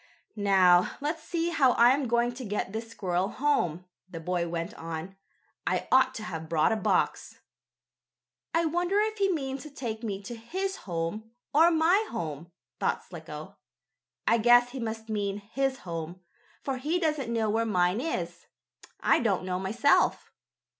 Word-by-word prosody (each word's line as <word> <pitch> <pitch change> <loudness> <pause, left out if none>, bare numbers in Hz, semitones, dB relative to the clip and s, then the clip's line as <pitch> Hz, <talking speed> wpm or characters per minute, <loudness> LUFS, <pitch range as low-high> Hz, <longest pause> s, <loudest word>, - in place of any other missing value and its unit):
"Now, 190 -4 +4
let's 310 +3 -2
see 335 +1 -1
how 270 -7 +4
I 240 +1 +6
am 270 0 +1
going 240 +1 +1
to 255 +1 -7
get 205 -2 -3
this 225 +1 -3
little - - -18
squirrel 185 -4 -1
home," 180 - 0 0.2
the 165 - -7
boy 175 +1 -1
went 170 0 -4
on. 165 +3 -6 0.5
"I - - 0
ought 260 0 +4
to 215 - -5
have 160 -6 -6
brought 160 +4 +3
a - - +2
box." 215 - 0 1.1
"I 330 0 +2
wonder 350 +5 +1
if 430 0 0
he 390 -1 +3
means 275 -2 -4
take 225 -5 -4
me 205 -4 -3
to 240 - -6
his 380 +13 -3
home 170 +6 -3 0.2
or 320 +4 +6
my 345 +6 +3
home?" 160 +1 -5 0.3
thought - - 0
Slicko. - - -9 0.7
"I 230 - +4
guess 240 +2 +5
he 265 - -6
must 225 -1 -4
mean 205 -2 -2
his 265 +6 -2
home, 170 0 -6 0.4
for 270 -2 -2
he 300 +7 0
doesn't 305 -8 -1
know 220 -2 +1
where 225 +2 +1
mine 185 -1 +1
is 175 - -4 0.5
I - - +4
don't 195 -6 0
know 180 -1 -2
myself." 220 +9 +2
225 Hz, 165 wpm, -28 LUFS, 180-275 Hz, 1.1 s, I